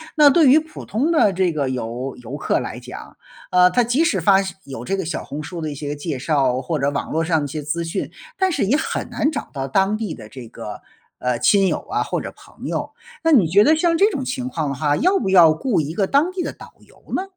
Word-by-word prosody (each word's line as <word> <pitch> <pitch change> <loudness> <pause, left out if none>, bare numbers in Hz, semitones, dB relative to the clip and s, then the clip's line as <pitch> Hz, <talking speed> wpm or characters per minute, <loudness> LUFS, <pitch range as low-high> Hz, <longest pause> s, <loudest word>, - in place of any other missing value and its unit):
那 300 -2 +7
对 310 0 +5
于 290 +5 +7
普 315 0 -10
通 275 +10 0
的 215 - +3
这 180 -1 +1
个 140 -4 -1
游 125 +2 -4
游 125 +5 -7
客 140 - 0
来 - - -6
讲， - - -11 0.3
呃， 180 0 +5
他 245 +5 +3
即 245 +7 +2
使 200 - +1
发 195 +3 +5
现 190 - -6
有 130 -3 -8
这 195 - -1
个 190 - -2
小 165 - -4
红 145 - -6
书 170 +2 -7
的 155 -1 -3
一 - - -5
些 145 +1 -5
介 145 -2 -4
绍， 135 -3 +1
或 155 +5 -2
者 140 0 0
网 140 - -3
络 160 +1 0
上 160 -1 +1
的 145 - -2
一 - - -3
些 150 +2 -5
资 165 +4 -2
讯， 165 - -4 0.3
但 380 -1 +2
是 235 - 0
也 250 +9 +2
很 - - -3
难 300 - 0
找 - - -5
到 135 -2 -4
当 195 +8 +1
地 215 -7 -4
的 110 -2 -11
这 125 0 -10
个， 105 -2 -8 0.4
呃， 125 -2 -1
亲 195 -2 +4
友 - - 0
啊 - - 0
或 - - -3
者 - - -6
朋 - - -11
友。 - - -3 0.3
那 325 - +3
你 220 - +5
觉 200 +6 +5
得 310 +6 +5
像 335 +1 +2
这 415 +4 +4
种 270 -6 -3
情 250 0 -3
况 160 - -2
的 140 - -3
话， 145 +1 +1
要 370 +4 +2
不 195 - -1
要 170 -4 +7
雇 210 +2 0
一 155 +2 -5
个 200 - +1
当 285 - +2
地 370 -1 -3
的 - - -4
导 - - -13
游 - - -22
呢？ 375 - -1
180 Hz, 285 characters per minute, -21 LUFS, -, 0.4 s, 那